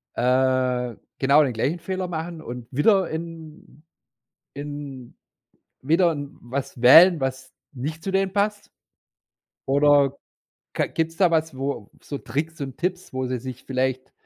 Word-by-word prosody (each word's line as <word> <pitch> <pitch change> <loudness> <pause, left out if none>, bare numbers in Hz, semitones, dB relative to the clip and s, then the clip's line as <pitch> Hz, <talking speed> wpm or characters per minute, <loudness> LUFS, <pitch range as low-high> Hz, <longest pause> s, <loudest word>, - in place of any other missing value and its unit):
äh, 125 -1 +1 0.2
genau 140 +3 +5
den 130 -4 -1
gleichen 135 +10 -1
Fehler 185 +2 -3
machen 165 -1 -5
und 125 -4 -8
wieder 190 - +3
in 160 -2 -8 0.7
in 145 -3 -7 0.7
wieder 165 +4 +3
was 140 -2 -6
wählen, 165 +7 +8
was 130 0 -4 0.2
nicht 150 +5 -5
zu 195 - -2
denen 195 0 +1
passt? 205 +1 -1 1.0
Oder, 140 0 +4 0.6
ka - - +1
gibt's 165 0 -2
da 185 -3 +4
was, 160 -3 0
wo 135 -6 -4
so 145 - -5
Tricks 150 +7 -4
und 135 -2 -6
Tipps, 180 +1 -3
wo 130 0 -2
sie 125 0 -2
sich 130 +1 -8
vielleicht 130 0 -2
145 Hz, 135 wpm, -24 LUFS, 130-165 Hz, 1.0 s, wählen